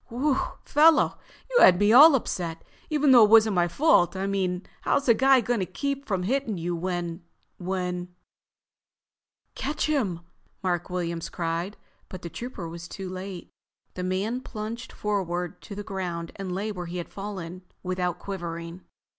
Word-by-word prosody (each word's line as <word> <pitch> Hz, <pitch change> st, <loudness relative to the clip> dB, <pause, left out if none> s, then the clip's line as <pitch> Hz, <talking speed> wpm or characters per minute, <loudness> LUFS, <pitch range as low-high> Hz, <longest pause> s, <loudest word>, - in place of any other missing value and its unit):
"Whew, 265 Hz, +4 st, 0 dB, 0.3 s
fellow, 310 Hz, +2 st, +4 dB, 0.3 s
you -, -, +4 dB
had 180 Hz, -, +8 dB
me 205 Hz, +2 st, +4 dB
all 290 Hz, +4 st, +9 dB
upset, 170 Hz, -9 st, -3 dB, 0.3 s
even 300 Hz, -3 st, +3 dB
though 245 Hz, -3 st, +9 dB
it 210 Hz, -, +5 dB
wasn't 220 Hz, -1 st, +6 dB
my 175 Hz, -2 st, +2 dB
fault. 175 Hz, -, +3 dB
I 190 Hz, +1 st, -2 dB
mean, 190 Hz, -2 st, -1 dB, 0.2 s
how's 280 Hz, -, +1 dB
a 235 Hz, -, +7 dB
guy 265 Hz, +2 st, +5 dB
gonna 230 Hz, -5 st, -1 dB
keep 280 Hz, +6 st, -3 dB
from 190 Hz, -3 st, -1 dB
hitting 240 Hz, -1 st, -1 dB
you 175 Hz, +1 st, -2 dB
when—when——" 180 Hz, +1 st, -4 dB, 1.4 s
"Catch 290 Hz, +4 st, -2 dB
him!" 220 Hz, -, 0 dB, 0.4 s
Mark 175 Hz, -2 st, -1 dB
Williams 170 Hz, -2 st, -3 dB
cried, 170 Hz, +3 st, -3 dB, 0.3 s
but 185 Hz, -, -9 dB
the 170 Hz, -, -6 dB
Trooper 205 Hz, -1 st, -6 dB
was 170 Hz, +1 st, -8 dB
too 190 Hz, +1 st, -7 dB
late. 185 Hz, -1 st, -7 dB, 0.4 s
The 180 Hz, -, -5 dB
other 180 Hz, -, -2 dB
man 210 Hz, +7 st, -1 dB
plunged 230 Hz, +1 st, -6 dB
forward 180 Hz, -4 st, -3 dB
to 205 Hz, -, -9 dB
the 205 Hz, -, -5 dB
ground 175 Hz, -4 st, -4 dB
and 195 Hz, -2 st, -5 dB
lay 200 Hz, +4 st, -2 dB
where 180 Hz, -3 st, -6 dB
he 175 Hz, +1 st, -5 dB
had 175 Hz, -, -6 dB
fallen 185 Hz, -3 st, -6 dB, 0.2 s
without 180 Hz, -1 st, -1 dB
quivering. 170 Hz, -2 st, -6 dB
190 Hz, 160 wpm, -26 LUFS, 175-225 Hz, 1.4 s, all